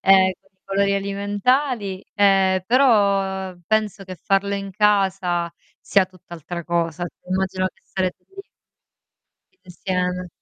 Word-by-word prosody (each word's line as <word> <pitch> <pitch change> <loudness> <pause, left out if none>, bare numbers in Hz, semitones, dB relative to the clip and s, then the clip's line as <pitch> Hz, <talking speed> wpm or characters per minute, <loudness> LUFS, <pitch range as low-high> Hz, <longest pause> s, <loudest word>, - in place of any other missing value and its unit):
ehm, 190 -1 +5
con 190 - -33
i 190 - -46
colori 200 0 +1
alimentari, 200 +2 0
ehm, 195 -2 +4
però 200 -7 +2
penso 215 -2 0
che 185 -1 -7
farlo 200 +2 0
in 195 0 -4
casa 190 -4 +1 0.3
sia 195 -1 +3
tutt'altra 175 -2 -9
cosa. 170 0 -1 0.2
Immagino 185 0 0
che - - -32
sarete 185 -1 -3
lì 390 0 -10 1.2
insieme. 180 0 -3
195 Hz, 115 wpm, -22 LUFS, 185-200 Hz, 1.2 s, ehm